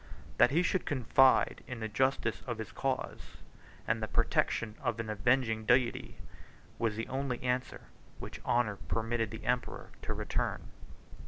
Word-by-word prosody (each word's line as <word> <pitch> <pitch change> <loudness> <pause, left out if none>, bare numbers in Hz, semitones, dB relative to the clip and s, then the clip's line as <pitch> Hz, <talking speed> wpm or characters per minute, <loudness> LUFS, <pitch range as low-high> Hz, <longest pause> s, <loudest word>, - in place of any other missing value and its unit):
"That 120 - +7
he 165 +5 +2
should 185 +1 0
confide 130 -1 +4
in 125 -2 -5
the 110 - -2
justice 130 +6 0
of 120 -2 -2
his 110 - -6
cause, 135 -1 -3 0.5
and - - +1
the - - -1
protection 110 -2 +1
of 115 -4 -1
an 110 -1 -3
avenging 110 +1 +2
Deity," 125 +1 +2 0.6
was 115 -2 0
the 115 - -3
only 130 -1 -2
answer 125 0 -1 0.4
which - - -8
honor 115 -4 +1
permitted 115 +1 -1
the 110 +1 -8
emperor 125 0 -2
to - - -3
return. - - -2
120 Hz, 150 wpm, -32 LUFS, 110-130 Hz, 0.6 s, That